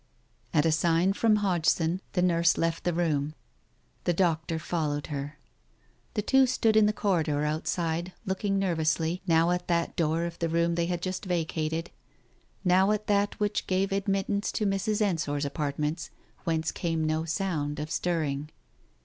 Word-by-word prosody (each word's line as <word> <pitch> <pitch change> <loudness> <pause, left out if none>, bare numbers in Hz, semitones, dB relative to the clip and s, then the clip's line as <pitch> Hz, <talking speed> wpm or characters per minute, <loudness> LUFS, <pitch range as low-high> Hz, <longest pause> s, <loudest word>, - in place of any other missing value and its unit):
At 150 -1 +3
a 165 - +4
sign 170 +4 +2
from 220 +1 +3
Hodgson, 175 -3 +1
the 180 - +2
nurse 170 -1 +3
left 165 0 -1
the 175 - +2
room. 155 -3 0 0.7
The 175 - +2
doctor 165 -2 +1
followed 155 -3 -2
her. 145 +2 -5 0.8
The 210 - 0
two 265 +3 +4
stood 225 -3 +2
in 215 -1 +6
the - - +3
corridor 165 -8 0
outside, 165 +3 -1
looking 195 +1 -1
nervously, 165 -2 0
now 165 +1 +4
at 180 0 -1
that 170 -1 0
door 165 0 +1
of 170 -1 -6
the 165 - 0
room 170 +1 +2
they 170 0 0
had 175 -1 -2
just 185 +2 -3
vacated, 165 -1 -2 0.7
now 185 +1 +4
at 215 0 0
that 205 0 +1
which 210 0 -1
gave 190 +1 +1
admit 195 0 0
tance 200 0 -1
to 215 - 0
Mrs. 200 +2 0
Ensor's 155 -7 0
apartments, 150 +3 -2 0.4
whence 160 -2 0
came 165 -2 -1
no 155 +1 0
sound 160 -4 -2
of 155 +1 -5
stirring. 150 -4 -1
170 Hz, 160 wpm, -28 LUFS, 160-190 Hz, 0.8 s, in